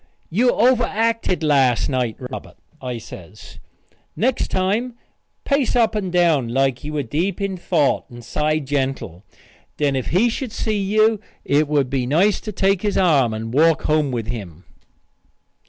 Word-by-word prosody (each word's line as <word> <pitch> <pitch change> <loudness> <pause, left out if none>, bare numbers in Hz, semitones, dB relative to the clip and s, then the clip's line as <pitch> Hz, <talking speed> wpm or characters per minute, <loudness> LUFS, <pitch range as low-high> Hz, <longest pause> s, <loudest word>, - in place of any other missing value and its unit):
You 240 +8 +3
overacted 230 -6 +1
last 135 -5 +3
night, 125 -4 -1
Robert," 130 0 -8 0.2
I 125 -2 -4
says. 100 -2 -12 0.6
"Next 250 +3 0
time 210 +7 -1 0.5
pace 280 -4 +1
up 230 -3 +3
and 200 -4 -2
down 170 -8 +2
like 130 +1 0
you 150 +1 -5
were 145 -2 -1
deep 170 - -2
in 195 -1 -2
thought 170 -5 0
and 120 -1 -12
sigh 150 +5 0
gentle. 135 - -3 0.5
Then 145 -2 +1
if 130 - -2
he 195 +8 +3
should 240 +1 -3
see 215 -2 -1
you 215 +2 +2 0.3
it 145 +2 +2
would 140 -3 0
be 130 -3 -1
nice 180 +9 +2
to 215 - -6
take 195 -1 +1
his 205 -2 -1
arm 145 -10 +3
and 110 +1 -5
walk 160 +3 +3
home 150 -2 +1
with 120 -4 -3
him." 95 -8 -7
155 Hz, 155 wpm, -21 LUFS, 130-205 Hz, 0.6 s, You